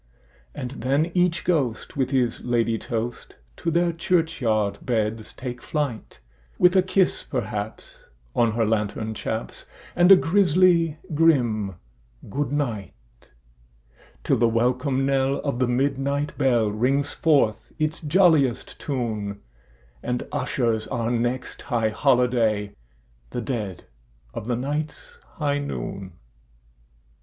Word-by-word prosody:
And 125 - -5
then 140 +6 0
each 180 -1 +2
ghost 140 -10 -1
with 130 -3 0
his 125 -4 +1
ladye 115 -2 0
toast 115 0 -4 0.2
to 170 - -2
their 170 +1 +2
churchyard 140 - 0
beds 110 -2 -1
take 125 -1 -7
flight, 145 -7 -4 0.4
With 180 +1 +5
a 190 - +6
kiss, 185 0 +1
perhaps, 105 -4 -5 0.3
on 115 -2 +3
her 115 0 +1
lantern 110 0 -1
chaps, 110 +1 -5 0.3
and 175 +2 +5
a - - +12
grisly 175 -3 +3 0.2
grim 120 - +2 0.6
"good 140 +1 -1
night"; 120 - -2 1.3
Till - - +2
the 120 - +4
welcome 125 +4 +1
knell 135 0 +2
of 140 -4 -2
the 125 - +2
midnight 140 +3 0
bell 120 -6 +2
rings 135 +7 +1
forth 140 -9 +2
its 155 +1 -1
jolliest 155 -6 +2
tune, 110 -7 -3 0.6
And 125 0 -3
ushers 115 -3 0
our 120 -2 -2
next 120 +2 -2
high 115 -4 0
holiday—the 105 - -1
dead 105 - -4 0.5
of 105 - -6
the 125 - +1
night's 150 - -4 0.2
high 145 -2 0
noon! 100 -9 -5
125 Hz, 115 wpm, -24 LUFS, 110-150 Hz, 1.3 s, a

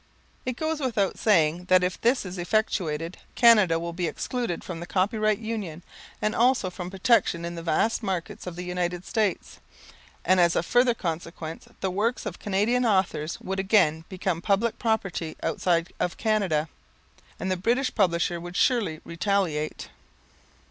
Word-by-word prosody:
It 255 - -1
goes 315 0 -1
without 225 -8 0
saying 175 -4 +3
that 185 0 +4
if 180 0 -2
this 240 -1 +2
is 185 0 -6
effectuated 175 -4 -1 0.2
Canada 210 -8 +6
will 170 0 -4
be 175 0 -1
excluded 235 -2 -3
from 170 -3 -6
the 175 - -7
Copyright 215 +3 +1
Union 205 -7 -5 0.4
and 215 - +1
also 240 -6 +2
from 180 -1 -6
protection 190 -3 +2
in 170 - -4
the 170 - -6
vast 170 +9 +1
market 185 -4 -4
of 175 - -5
the 180 - -5
United 180 0 -2
States; 215 -6 -1 0.7
and 185 +1 +4
as 170 -1 +4
a - - +2
further 245 +5 +3
consequence 165 -3 -5
the 190 - 0
works 225 +7 -1
of 205 -5 -5
Canadian 210 +5 +1
authors 190 -7 0
would 190 0 -3
again 190 -6 +3
become 185 -2 -2
public 205 +5 +1
property 195 -8 -1
outside 170 0 0
of 180 - -1
Canada, 195 -9 +1 0.7
and 190 - -2
the - - +2
British 240 +8 0
publisher 175 -4 +1
would 175 +1 -8
surely 200 -11 +1
retaliate. 170 -4 -1
185 Hz, 155 wpm, -26 LUFS, 170-215 Hz, 0.7 s, Canada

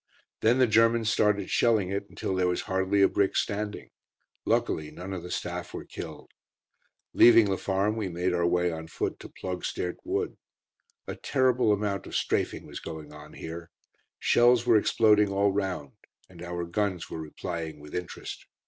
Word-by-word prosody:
Then 115 +3 +3
the 130 - +5
Germans 115 0 +3
started 105 -3 +1
shelling 110 -6 +2
it 100 +1 -3
until - - -3
there 95 -1 +1
was 90 0 0
hardly 95 +1 +1
a - - +7
brick 100 -1 +1
standing. 105 0 -3 0.5
Luckily 75 -1 0
none 95 +2 -7
of 90 - -4
the 90 - -9
staff - - -4
were - - -6
killed. - - -9 0.8
Leaving 115 -2 +7
the 95 -1 0
farm, 100 +2 0
we 105 -4 -2
made 90 +1 -1
our 85 -1 +2
way 90 0 +2
on 80 0 -6
foot - - -3
to - - -10
Ploegsteert 90 -1 -4
Wood. 395 +5 -2 0.7
A - - -4
terrible 130 -4 +2
amount 100 -2 -1
of - - -7
"strafing" - - -1
was - - -8
going 80 -2 -8
on 75 0 -12
here. 85 +1 -8 0.5
Shells 120 0 +4
were 120 -2 +5
exploding 105 -1 +4
all 100 +1 +2
round, 95 -8 -2 0.4
and 85 -2 -14
our 85 0 -4
guns 90 -1 -2
were 80 - -4
replying 80 0 -5
with 75 0 -12
"interest." 90 -1 -6
95 Hz, 170 wpm, -28 LUFS, 85-105 Hz, 0.8 s, a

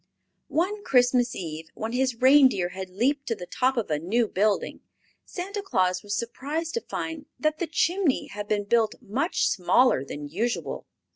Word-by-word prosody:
One 400 +6 -1
Christmas 245 -3 +3
Eve, 160 -2 -6
when 220 +1 -4
his 255 0 0
reindeer 255 -7 +5
had 190 +1 -7
leaped 270 +9 0
to 230 - 0
the 180 - -8
top 255 +7 0
of 225 -8 -1
a 150 - +1
new 220 +8 +1
building, 205 +1 0 0.4
Santa 395 +3 -5
Claus 185 - +1
was 205 0 -3
surprised 295 +7 -3
to 465 - -1
find 315 -7 -5
that 310 0 0
the 345 - -1
chimney 335 -1 +1
had 205 0 -7
been 205 -1 0
built 220 +1 +2
much 270 - 0
smaller 190 - +3
than 145 +1 -7
usual. 220 +11 -3
240 Hz, 165 wpm, -26 LUFS, 195-295 Hz, 0.4 s, reindeer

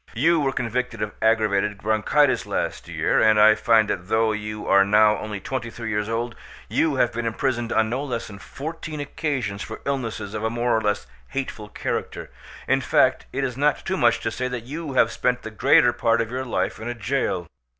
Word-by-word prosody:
You 160 +8 +3
were 140 -2 +1
convicted 125 -2 -2
of 105 - -3
aggravated 105 -2 +2
bronchitis 110 +3 +2
last - - -3
year: - - +1
and 110 -1 +5
I 110 +1 +8
find 110 0 +3
that 90 -2 -3
though 110 +1 +2
you 105 0 -5
are 100 0 +5
now 105 +1 +4
only 105 -2 -5
twenty 130 +2 -4
three 115 -1 -6
years 105 +1 -1
old, 115 +1 -2 0.3
you 155 -3 +1
have 125 -2 +2
been 120 0 -2
imprisoned 120 0 -1
on 110 0 +2
no 130 +3 -1
less 125 -5 -3
than 100 -2 -10
fourteen 155 +5 -7
occasions 135 -8 -3
for 110 - -6
illnesses 115 -7 -3
of 110 0 -4
a 110 - +1
more 120 +1 0
or 110 - +1
less 105 -5 -1 0.2
hateful 115 -6 -5
character; - - -4 0.4
in - - +2
fact, - - +2
it 140 - -2
is 125 -3 -2
not 145 +2 +1
too 190 - -1
much 120 -8 +3
to 115 - -2
say 125 +3 -2
that 125 -2 -5
you 150 +3 -6
have 115 -3 +3
spent 125 0 -1
the 110 - -6
greater 120 +2 +4
part 115 -1 +1
of 115 0 -2
your 130 +1 -3
life 120 - -2
in 110 - -6
a 120 - -3
jail. 115 -6 -1
115 Hz, 210 wpm, -23 LUFS, 110-130 Hz, 0.4 s, I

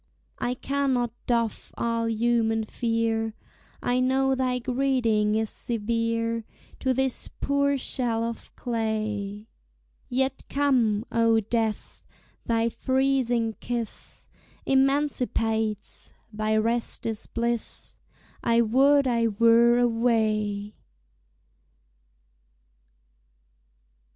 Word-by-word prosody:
I 245 +1 -1
cannot 260 -3 0 0.2
doff 230 -3 -1
all 230 -1 0
human 225 -1 +1
fear; 225 -1 -1 0.5
I 245 +1 +1
know 265 +1 +2
thy 255 -1 0
greeting 245 -4 +1
is 220 -1 -1
severe 230 0 -1 0.4
To 260 - +1
this 265 0 0
poor 280 0 +1
shell 240 -3 -1
of 230 0 -5
clay: 215 -3 -3 0.6
Yet 265 +1 -1
come, 245 -7 +2
O 230 -1 +3
Death! 220 0 -2 0.4
thy 230 0 +2
freezing 255 -2 +1
kiss 235 -3 -5 0.4
Emancipates! 250 -6 0 0.2
thy 215 +1 0
rest 230 +2 0
is 220 -2 -3
bliss! 235 0 -2 0.5
I 235 0 +3
would 275 +5 +4
I 235 -2 +2
were 230 +2 +5
away! 220 -4 +1
230 Hz, 85 wpm, -26 LUFS, 225-255 Hz, 0.6 s, were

